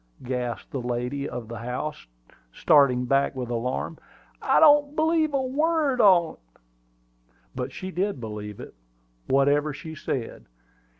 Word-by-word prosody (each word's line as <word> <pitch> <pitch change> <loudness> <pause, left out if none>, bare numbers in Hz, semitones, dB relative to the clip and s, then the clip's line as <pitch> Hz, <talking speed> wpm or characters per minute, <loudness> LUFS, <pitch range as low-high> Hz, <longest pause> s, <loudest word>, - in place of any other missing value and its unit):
gasped 125 -2 -4
the 135 - -3
lady 125 +3 -3
of 120 -2 -6
the 115 -1 -7
house, 125 +6 -5 0.4
starting 125 - +3
back 135 +2 +1
with 125 -2 -5
alarm. 125 +7 -3 0.4
"I - - +3
don't 295 -2 +5
believe 315 0 +2
a 275 -1 0
word 290 -1 +1
on't!" 180 -6 +4 1.1
But - - -4
she 185 0 -7
did 190 -2 -2
believe 105 -2 -7
it, - - -10 0.5
whatever 145 +2 +2
she 160 +2 -8
said. 130 -5 -5
140 Hz, 130 wpm, -25 LUFS, -, 1.1 s, don't